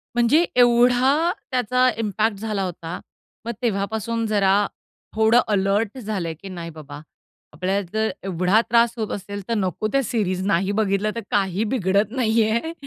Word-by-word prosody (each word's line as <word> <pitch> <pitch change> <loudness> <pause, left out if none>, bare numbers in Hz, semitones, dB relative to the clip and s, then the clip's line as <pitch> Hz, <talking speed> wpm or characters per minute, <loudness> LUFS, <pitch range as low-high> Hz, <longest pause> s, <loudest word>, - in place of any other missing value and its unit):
म्हणजे 250 +9 +4
एवढा 250 +6 +4 0.2
त्याचा 250 +1 +2
इम्पॅक्ट 215 -1 0
झाला 210 -3 -2
होता. 170 -1 -5 0.5
मग 235 - -2
तेव्हापासून 220 +1 -1
जरा, 205 -1 +2 0.5
थोडं 220 +2 +4
अलर्ट 205 +3 0
झालं, 200 -8 -3
की 195 - -8
नाही 170 -2 -7
बाबा, 145 -2 -9 0.5
आपल्याला 185 +5 -1
जर 220 0 +1
एवढा 185 +3 +2
त्रास 235 0 +4
होत 220 -2 -3
असेल, 200 0 -7
तर - - +1
नको 195 +1 -1
त्या 275 - +2
सीरीज 190 -5 -1
नाही 195 +1 +1
बघितलं, 205 0 0
तर 230 - -3
काही 195 +1 +1
बिघडत 200 -1 +1
नाही 225 -3 +2
आहे. 275 +9 -1
215 Hz, 150 wpm, -22 LUFS, 195-235 Hz, 0.5 s, म्हणजे